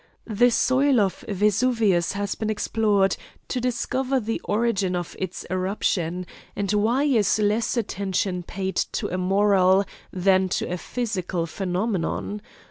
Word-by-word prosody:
The 240 +2 +3
soil 260 +2 +3
of 195 -3 0
Vesuvius 210 -3 +2
has 200 0 -2
been 220 - -3
explored 205 -2 +1 0.3
to 250 - -1
discover 255 +2 0
the 225 -1 -3
origin 205 -4 0
of 175 -1 -4
its 185 -1 -4
eruption; 185 -1 -1 0.3
and 205 0 -1
why 225 +6 +2
is 230 -10 +3
less 215 +3 +1
attention 190 -4 -1
paid 190 +2 -4 0.2
to - - -2
a 185 - -1
moral 195 0 +3 0.3
than 190 0 +2
to - - -1
a 180 - -3
physical 190 -8 -2
phenomenon? 190 +3 -2
200 Hz, 130 wpm, -24 LUFS, 185-225 Hz, 0.3 s, The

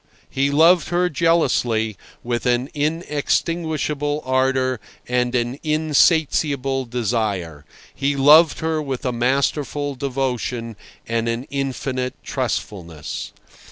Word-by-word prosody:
He 140 +1 +1
loved 165 +3 +4
her 175 +1 +1
jealously, 125 -9 +1 0.3
with 120 +1 -2
an 125 +2 +1
inextinguishable 150 -1 -1
ardour 130 -1 +1 0.3
and 125 0 0
an 120 +3 -1
insatiable 150 -3 +2
desire—he 110 - -3
loved 150 +4 +6
her 160 -1 0
with 135 -4 -4
a 125 - +1
masterful 140 +4 0
devotion 125 -3 -3 0.3
and 115 0 -1
an 115 +2 -2
infinite 130 -2 -2
trustfulness. 95 - -4
135 Hz, 95 wpm, -21 LUFS, 120-150 Hz, 0.3 s, loved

